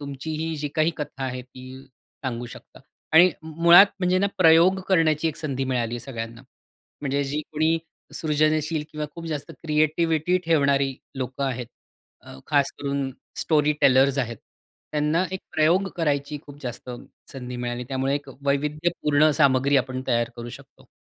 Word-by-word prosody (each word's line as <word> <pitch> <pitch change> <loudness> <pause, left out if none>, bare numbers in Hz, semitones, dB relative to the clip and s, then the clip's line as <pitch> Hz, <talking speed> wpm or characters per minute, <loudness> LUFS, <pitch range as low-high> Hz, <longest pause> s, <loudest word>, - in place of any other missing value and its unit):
तुमचीही 155 +3 -4
जी 150 0 -3
काही 155 +1 +3
कथा 145 -2 -6
आहे 130 -1 -4
ती 130 0 -14 0.6
सांगू 120 -2 -3
शकता. - - -14 0.3
आणि 175 +3 +7
मुळात 170 +4 +7
म्हणजे 180 0 +2
ना 200 - +2
प्रयोग 170 +2 +5
करण्याची 165 -4 +3
एक 155 - -5
संधी 135 -4 -3
मिळाली 120 -3 -1
आहे 120 - -5
सगळ्यांना. 115 -2 -7 0.6
म्हणजे 140 0 -1
जी 145 +2 -2
कोणी 160 +2 +2 0.4
सृजनशील 155 0 0
किंवा 150 0 -4
खूप 170 -1 -8
जास्त 150 -3 -4
क्रिएटिव्हिटी 160 +2 +1
ठेवणारी 140 -4 +2 0.2
लोक 130 +1 -5
आहेत, 125 -3 -2 0.5
अ, - - -12
खासकरून 140 -1 0 0.3
स्टोरी 150 -2 +2
टेलर्स 135 +1 +4
आहेत, 120 -3 -2 0.6
त्यांना 150 +4 +1
एक 190 - -4
प्रयोग 170 +5 +3
करायची 145 -3 -1
खूप 145 0 -12
जास्त 125 0 -6 0.4
संधी 125 -2 -7
मिळाली 120 0 -4
त्यामुळे 135 +1 0
एक 145 0 -5 0.2
वैविध्यपूर्ण 150 +1 +2
सामग्री 140 0 +4
आपण 130 0 -1
तयार 120 0 +1
करू 120 0 -7
शकतो. - - -14
145 Hz, 145 wpm, -24 LUFS, 130-160 Hz, 0.6 s, आणि